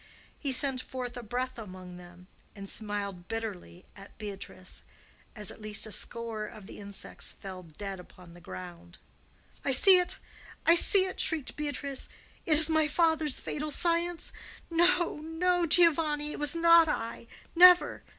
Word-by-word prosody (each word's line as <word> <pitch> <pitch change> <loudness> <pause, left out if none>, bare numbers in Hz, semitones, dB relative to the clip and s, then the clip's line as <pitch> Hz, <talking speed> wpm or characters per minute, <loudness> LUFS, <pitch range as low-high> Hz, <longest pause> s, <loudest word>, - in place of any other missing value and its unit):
He 280 - -2
sent 260 0 +1
forth 250 -2 -7
a 245 - -6
breath 250 +2 -4
among 185 -4 -10
them, 180 0 -15 0.3
and 200 -1 -9
smiled 200 -4 -5
bitterly 210 -5 -7
at 200 0 -15
Beatrice 200 -3 -8 0.5
as 210 -4 -5
at - - -14
least 215 0 +2
a 215 - -7
score 230 -1 -3
of 210 -1 -12
the - - -11
insects 200 0 -4
fell 190 -2 -9
dead 190 +4 -8
upon 180 -1 -15
the 175 - -15
ground. 175 0 -11 0.7
"I - - -2
see 365 +8 +8
it! 360 +1 +1 0.5
I 335 - +6
see 375 +3 +5
it!" 375 - -7
shrieked 315 -6 -1
Beatrice. 285 -2 -4 0.4
"It 320 - +3
is 310 +1 +6
my 315 -1 +2
father's 320 -2 +1
fatal 305 +1 -5
science! 340 +2 -1 0.4
No, 345 0 +2
no, 340 +3 -1
Giovanni; 305 -3 +3
it - - -7
was 295 +1 +2
not 335 0 +6
I! 230 -4 -4 0.3
Never! 360 +1 +6
255 Hz, 155 wpm, -29 LUFS, 200-325 Hz, 0.7 s, see